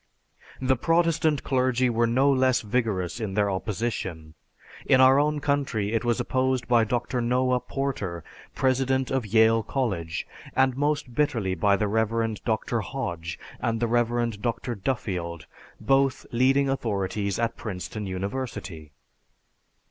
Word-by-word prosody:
The 130 0 +2
Protestant 165 0 +2
clergy 130 -1 +2
were 115 -1 +2
no 130 +4 +3
less 130 -1 +3
vigorous 105 -4 -1
in 105 -4 -4
their 100 -1 +2
opposition. 95 -6 -3 0.5
In 130 - +5
our 130 +1 +7
own 150 +1 +1
country 135 -8 -1
it 115 - 0
was 120 0 +1
opposed 130 0 0
by 120 -2 +4
Dr. 120 +2 -1
Noah 125 +1 +2
Porter, 125 - -4 0.3
president 130 0 +1
of 130 -5 -1
Yale 110 +2 +4
College, 95 -11 -2 0.3
and 130 -1 +3
most 145 -2 -1
bitterly 120 -10 0
by 100 +3 +3
the 105 +2 0
Rev. 110 0 0
Dr. 115 +1 -1
Hodge 85 - -4 0.2
and 115 -1 -1
the 120 - +1
Rev. 120 -2 0
Dr. 120 +1 -2
Duffield, 95 - -3 0.3
both 135 0 +2
leading 135 +3 +3
authorities 100 -6 -1
at 115 0 -1
Princeton 105 0 -5
University. 95 - -5
120 Hz, 135 wpm, -26 LUFS, 105-130 Hz, 0.5 s, our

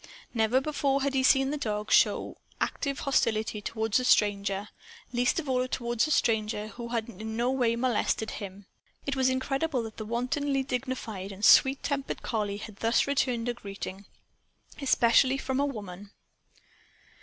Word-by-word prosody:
Never 230 +2 +3
before 275 -1 0
had 280 0 0
he 265 - +2
seen 270 +1 +4
the 300 - -2
dog 210 -4 -3
show - - +3 0.2
active 280 -2 -2
hostility 220 -5 0
toward 220 +2 0
a - - -2
stranger 200 -3 +2 0.4
least 245 +5 +2
of 310 - -6
all 255 -1 +1
toward 240 -2 -3
a - - -5
stranger 215 -5 +1
who 235 +3 -7
had 230 -2 -2
in 220 0 -6
no 240 +2 +1
way 245 -3 +1
molested 235 -2 0
him. 195 0 -8 0.4
It 280 - -1
was 260 -1 +3
incredible 270 +1 -1
that 225 -1 -8
the 215 - -5
wontedly 270 +4 -1
dignified 250 -7 -4
and 200 +2 -2
sweet 270 0 +6
tempered 280 -1 -3
collie 210 -3 -2
had 210 -1 -9
thus 230 +2 +2
returned 255 -4 0
a 245 - 0
greeting. 200 -3 -8 0.8
Especially 260 0 +4
from 265 0 -2
a 285 - +2
woman! 205 -6 -7
235 Hz, 160 wpm, -28 LUFS, 215-265 Hz, 0.8 s, sweet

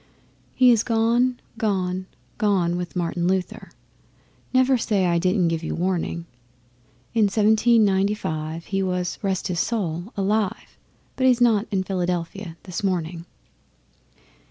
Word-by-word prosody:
He 255 -1 +6
is 230 -3 +4
gone, 235 +2 +1 0.2
gone, 185 -3 -1 0.3
gone 185 -5 +2
with 175 +1 -5
Martin 175 0 -1
Luther 185 0 -2 0.8
(Never 260 +1 +4
say 210 -5 +1
I 170 -1 +2
didn't 180 0 +2
give 165 -1 -2
you - - -3
warning). 170 -1 -2 0.9
In 215 -3 +3
Seventeen 220 +2 +4
Ninety 195 +1 +2
five 160 -3 -4
he 195 0 -1
was 180 -1 -2
(rest 190 -2 -1
his 175 -2 -2
soul!) 180 -3 -2
alive, 200 0 -1 0.4
But 260 0 +3
he's 250 -2 +4
not 230 -3 +3
in 190 -2 0
Philadelphia 180 -1 -3
this 180 0 -5
morning. 170 -3 -2
190 Hz, 130 wpm, -23 LUFS, 175-220 Hz, 0.9 s, He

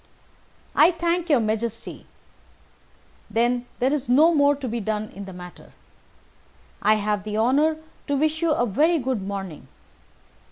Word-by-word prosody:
"I - - +7
thank 345 0 -1
your 285 -5 +5
Majesty. 225 +1 -3 1.2
Then 240 +3 0
there 260 +3 +1
is 275 -5 -3
no 310 +7 +5
more 285 -1 +4
to 275 -2 -6
be 235 0 -3
done 215 0 -3
in 200 +1 -9
the 190 - -9
matter. 180 -1 -12 1.1
I 215 +1 +4
have 210 -1 -1
the 210 0 -4
honour 285 +8 +2 0.3
to 285 -1 0
wish 310 +2 0
you 335 - +2
a 270 -6 +2
very 310 - +2
good 255 -6 -2
morning." 190 -8 -6
240 Hz, 150 wpm, -24 LUFS, 210-300 Hz, 1.2 s, I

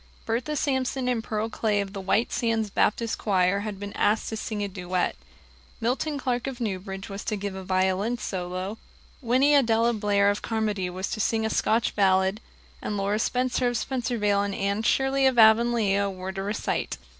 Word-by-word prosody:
Bertha 240 +7 -1
Sampson 265 -2 -1
and 240 -3 0
Pearl 215 0 -2
Clay 215 -2 0
of 200 -1 -3
the 195 - -5
White 200 +5 +1
Sands 225 -3 0
Baptist 225 +3 +1
choir 190 -1 +2
had 205 -1 -5
been 205 0 -6
asked 215 +2 +1
to 220 - -4
sing 215 -1 -3
a - - -1
duet; 180 -2 -2 0.6
Milton 265 +6 -1
Clark 250 -2 -2
of 265 -2 -5
Newbridge 195 -3 -4
was 200 +1 -6
to 215 - -1
give 200 -1 -4
a 190 0 -7
violin 190 +5 +1
solo; 185 0 -4 0.4
Winnie 260 +4 +3
Adella 235 -4 +3
Blair 205 -2 +2
of 205 - -4
Carmody 210 -5 -1
was 185 +2 -4
to 215 - -3
sing 220 +1 +1
a 220 - -1
Scotch 220 +1 +1
ballad; 190 +1 +2 0.4
and 210 - -3
Laura 200 +2 0
Spencer 250 +1 0
of 245 -1 0
Spencervale 230 -6 0
and 200 -1 -2
Anne 200 +2 -1
Shirley 270 +3 +2
of 260 -2 +1
Avonlea 220 -3 +4
were 185 0 -5
to 195 0 -5
recite. 205 +2 -2
215 Hz, 180 wpm, -26 LUFS, 195-235 Hz, 0.6 s, Avonlea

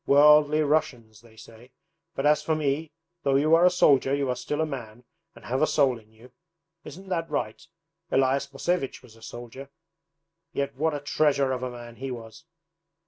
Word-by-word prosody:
"Worldly 150 +1 +6
Russians" 140 -8 -1
they 115 -1 -20
say. 115 +2 -15 0.5
But 135 - -2
as 150 0 +4
for 155 +1 0
me, 150 +1 -2 0.3
though 140 -3 +1
you 150 +4 +3
are 170 +2 +6
a - - +6
soldier 140 -6 +3
you 140 -2 -1
are 125 - 0
still 125 +5 -4
a 160 - +2
man, 120 -5 -8 0.3
and - - -15
have 130 +3 -1
a 155 - +4
soul 135 -5 +2
in 110 0 -24
you. 115 +3 -18 0.5
Isn't 190 +6 -11
that 165 -3 -2
right? - - -3 0.5
Elias 135 +1 +1
Mosevich 140 -1 -2
was 115 -3 -17
a 115 - -19
soldier, 120 +4 -10 0.8
yet 140 -1 -2
what 155 +3 -1
a 145 - -5
treasure 145 -2 +1
of 130 -1 -2
a 130 - -3
man 120 -1 -11
he 135 +3 -5
was! 115 -3 -9
135 Hz, 190 wpm, -26 LUFS, 120-150 Hz, 0.8 s, Worldly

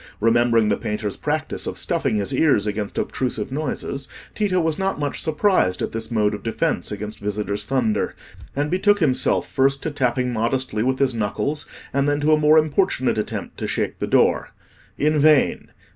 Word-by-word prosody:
Remembering 115 0 +3
the - - +1
painter's 105 -2 -3
practice - - -2
of - - -4
stuffing - - 0
his 100 -2 -1
ears 140 -10 +3
against 105 -1 -3
obtrusive 125 -3 -2
noises, 140 -1 -4 0.3
Tito 200 -4 +1
was 160 -1 0
not 195 -5 -1
much 145 -1 -2
surprised 160 - +2
at - - -2
this 115 0 -4
mode 105 -3 +1
of 105 - -5
defence 145 +6 -1
against 105 +1 -6
visitors' 105 0 -3
thunder, 115 -6 0 0.4
and 145 +2 -1
betook 205 +3 +3
himself 140 -7 +2
first 135 +1 +1
to 160 - -2
tapping 125 -2 0
modestly 115 0 -1
with 130 +3 +1
his 135 -2 +1
knuckles, 115 +7 -2 0.3
and 140 +1 +2
then 145 0 +1
to 150 +1 +3
a 155 - +4
more 155 +1 +5
importunate 155 - +1
attempt 105 - -5
to - - -3
shake - - -2
the - - -2
door. - - +2 0.4
In 150 +1 +2
vain! 150 -1 +3
130 Hz, 175 wpm, -22 LUFS, 110-150 Hz, 0.4 s, more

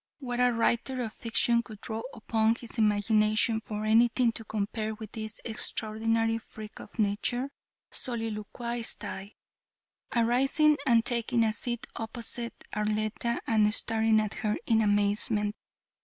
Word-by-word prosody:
What 245 -5 -4
writer 245 +1 +2
of 220 -2 -5
fiction 235 0 +2
could 220 -3 -11
draw 220 0 -4
upon 220 0 +1
his 235 -1 -7
imagination 215 +1 +3
for 215 -1 -4
anything 235 +2 +4
to 225 - -4
compare 215 +1 -3
with 215 -1 -9
this 215 -1 -3
extraordinary 225 0 +1
freak 215 -1 -11
of - - -12
nature?" 235 +5 0 0.4
soliloquized 230 0 -3
I, 195 +2 -7 0.8
arising 270 +6 +3
and 230 -2 +4
taking 235 -1 +1
a 220 -1 +2
seat 240 +3 -3
opposite 235 +1 -4
Arletta 215 +4 -1
and 215 -2 +3
staring 225 -1 +2
at 215 -1 -1
her 210 -2 -1
in 225 -2 +3
amazement. 205 0 +1
225 Hz, 125 wpm, -29 LUFS, 215-235 Hz, 0.8 s, anything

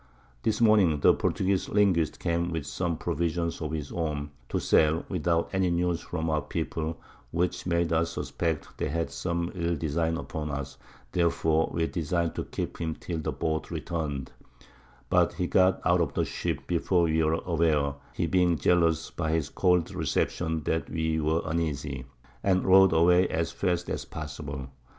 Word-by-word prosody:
This 110 -1 0
Morning, 105 -9 +5
the - - +7
Portugueze 95 0 0
Linguist 95 -6 +2
came 85 +1 0
with 80 -4 -3
some 85 +3 -2
Provisions 85 +1 -1
of 75 -1 -3
his 75 -3 -4
own, 75 -3 -3 0.2
to - - -1
sell, 80 +2 +3
without 85 -2 +1
any 95 -1 +2
News 85 0 0
from 80 -2 -3
our 75 -1 +1
People, 80 +1 -3 0.3
which 90 +4 -1
made 85 -1 +1
us 85 +1 +1
suspect 80 -3 -3
they - - -1
had 85 +3 -2
some 85 -1 -2
ill 85 -1 -1
Design 80 +2 -1
upon 80 -2 -5
us, 70 -1 -5 0.3
therefore 80 -1 +2
we 85 -1 0
design'd 85 0 -1
to - - -4
keep - - -5
him 80 -1 -2
till 85 -2 -5
the 80 - -2
Boat 80 0 -2
return'd, 75 -6 -3 0.8
but - - +4
he 90 - -2
got 95 +1 +3
out 90 0 +4
of 75 -4 -1
the - - +1
Ship, - - -3
before 90 +1 +2
we 80 -1 +2
were 80 0 +2
aware, 80 -4 +2 0.2
(he - - 0
being 90 -3 +3
jealous 80 +1 +2
by 80 -3 -2
his 80 -2 0
cold 90 -3 +2
Reception, 80 -2 -1
that 80 +2 -1
we 80 0 0
were 80 +2 +1
uneasy) 75 -5 -2 0.4
and 95 -2 +2
rowed 95 0 +7
away 90 +3 +5
as 80 +1 -1
fast 90 -2 -1
as - - -3
possible. 70 -3 -6
80 Hz, 170 wpm, -28 LUFS, 80-85 Hz, 0.8 s, the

